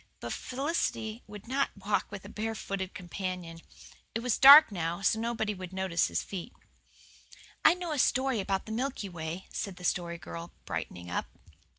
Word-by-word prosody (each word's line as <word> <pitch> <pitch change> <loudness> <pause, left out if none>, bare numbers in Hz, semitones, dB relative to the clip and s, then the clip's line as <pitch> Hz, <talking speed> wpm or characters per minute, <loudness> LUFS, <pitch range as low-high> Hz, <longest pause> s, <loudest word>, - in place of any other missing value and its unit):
But - - -4
Felicity 255 -5 -2
would 210 +1 -10
not 270 -2 0
walk 200 0 0
with 200 -1 -8
a - - -8
barefooted 210 -3 -4
companion. 180 -3 -5 0.6
It 225 - -1
was 250 -2 +1
dark 285 0 +11
now, 170 -1 -2
so 220 - +3
nobody 225 -2 -1
would 185 -2 -8
notice 190 -3 +1
his - - -1
feet. 190 -3 -7 1.1
"I 315 - +7
know 355 -2 -5
a 300 - -1
story 260 -2 +2
about 195 0 -1
the 220 - -7
Milky 240 -3 -2
Way," 170 +1 -5
said 200 -3 -3
the 180 - -12
Story 170 -1 -1
Girl, 170 0 -8
brightening 90 0 -5
up. - - -2
200 Hz, 170 wpm, -30 LUFS, 180-235 Hz, 1.1 s, dark